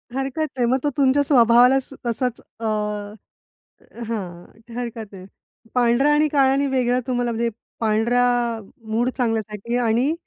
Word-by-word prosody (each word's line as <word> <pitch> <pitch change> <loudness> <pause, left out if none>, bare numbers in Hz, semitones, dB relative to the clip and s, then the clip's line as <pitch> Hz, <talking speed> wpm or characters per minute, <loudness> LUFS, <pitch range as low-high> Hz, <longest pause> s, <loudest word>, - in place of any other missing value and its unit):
हरकत 270 +4 -2
नाही. 245 - +2
मग 260 - +3
तो 290 - +2
तुमच्या 280 +1 +3
स्वभावालाच 250 0 +4 0.2
असाच 240 +1 -1 0.2
अ 225 - -5 1.4
हां, 180 -6 -5 0.3
हरकत 230 -3 -5
नाही. 185 -1 -10 0.5
पांढरा 245 +4 +3
आणि 300 +1 +3
काळा 275 -3 +3
आणि 280 +1 +1
वेगळा 250 -2 +1
तुम्हाला 245 -1 0
म्हणजे 235 +1 -1 0.3
पांढरा 225 +3 +2 0.7
मूड 240 +3 +1
चांगल्यासाठी 225 -1 -2
आणि 245 +5 +1
245 Hz, 130 wpm, -22 LUFS, 230-265 Hz, 1.4 s, स्वभावालाच